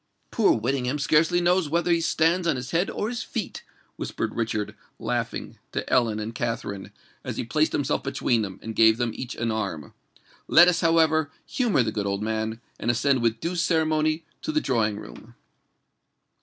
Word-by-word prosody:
"Poor 225 - +4
Whittingham 125 +4 -1
scarcely 160 +4 +3
knows 175 -2 +2
whether 170 +3 +1
he 170 -1 +3
stands 165 +2 +2
on 165 - +2
his 125 +1 -6
head 175 +3 +1
or 210 - -2
his 235 0 -3
feet," 220 -5 -5 0.4
whispered - - -3
Richard, 110 -2 -2 0.2
laughing, - - -3
to - - -3
Ellen 115 -3 +2
and 110 +2 -4
Katharine, 115 -4 -4 0.3
as - - -5
he - - -1
placed - - +1
himself - - 0
between 115 -2 0
them, 95 -3 -5
and 110 0 -6
gave 110 0 +6
them 120 -1 0
each 130 0 -6
an 115 -1 -1
arm. 95 -10 -4 0.5
"Let 175 +2 +7
us, 180 -1 +2
however, 160 -2 +3 0.2
humour 230 - +1
the 110 - -2
good 105 -1 -2
old 100 +1 -2
man, 110 +1 -2 0.2
and 120 - -2
ascend 125 +2 +2
with 115 -1 +1
due 170 +6 -3
ceremony 155 -2 +1 0.2
to 310 - -2
the 310 - +2
drawing 110 - 0
room." - - -12
130 Hz, 180 wpm, -25 LUFS, 110-165 Hz, 0.5 s, Let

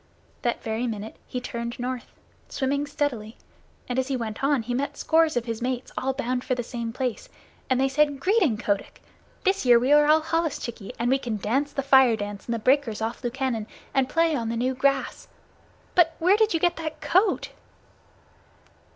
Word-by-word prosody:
That 240 - -1
very 225 +2 -2
minute 220 -1 -5
he 250 - -3
turned 235 -1 -5
north, 250 0 -4 0.4
swimming 280 +2 -1
steadily, 250 -7 -3 0.5
and 250 0 -1
as 260 - -1
he 270 -1 -1
went 225 0 -5
on 275 -4 +2
he 245 +2 -3
met 275 +3 -2
scores 320 -3 +3
of 235 - -1
his 230 -1 -4
mates, 250 0 -3
all 265 - 0
bound 250 0 -2
for 255 - 0
the 245 - -3
same 235 -1 -5
place, 250 -1 -3 0.4
and 260 -1 +2
they 270 - +3
said: 285 +1 +2
"Greeting, 365 - +2
Kotick! 205 -1 -3 0.4
This 385 +1 +1
year 245 -2 +7
we 250 +4 +1
are 295 0 +6
all 310 +1 +5
holluschickie, 315 -10 -2
and 240 +2 0
we 270 - +3
can 235 -4 -3
dance 270 +8 0
the 275 -1 -2
Fire 265 -3 +6
dance 205 -1 -6
in - - -3
the 230 - 0
breakers 255 -1 +2
off 225 +3 -4
Lukannon 240 -3 -2 0.3
and 265 -1 +2
play 330 -1 +2
on 230 -4 -2
the 230 - -2
new 255 +3 0
grass. 275 +1 0 0.7
But 330 -2 +4
where 360 +4 +4
did 440 0 +3
you - - +2
get 345 +1 +1
that 315 -2 -5
coat?" 375 +5 +2
260 Hz, 195 wpm, -25 LUFS, 235-290 Hz, 0.7 s, year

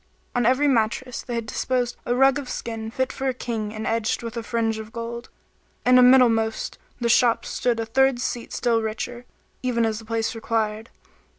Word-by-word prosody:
On 245 -2 +2
every 260 +4 +3
mattress 245 0 0
they 245 - -5
had 230 -1 -2
disposed 245 +1 -1
a 240 - +1
rug 270 +2 +4
of 265 -3 -7
skin 225 -1 -4
fit 260 +3 -2
for 270 - -3
a 260 - 0
King 225 -4 -3
and 215 0 -5
edged 225 0 0
with 230 +1 -6
a 230 - -2
fringe 225 -1 -1
of 220 0 -8
gold; 235 +1 -6 0.6
and 250 0 +7
a - - +8
middlemost 235 -3 +4 0.2
the 240 - 0
shop 235 0 +3
stood 240 -2 -1
a 225 - -1
third 265 +2 +2
seat 245 -1 -3
still 230 -2 +1
richer, 240 +3 -4 0.4
even 240 -2 +1
as 220 -1 -1
the 225 - -12
place 225 0 -1
required. 225 -1 -2
235 Hz, 195 wpm, -24 LUFS, 225-250 Hz, 0.6 s, a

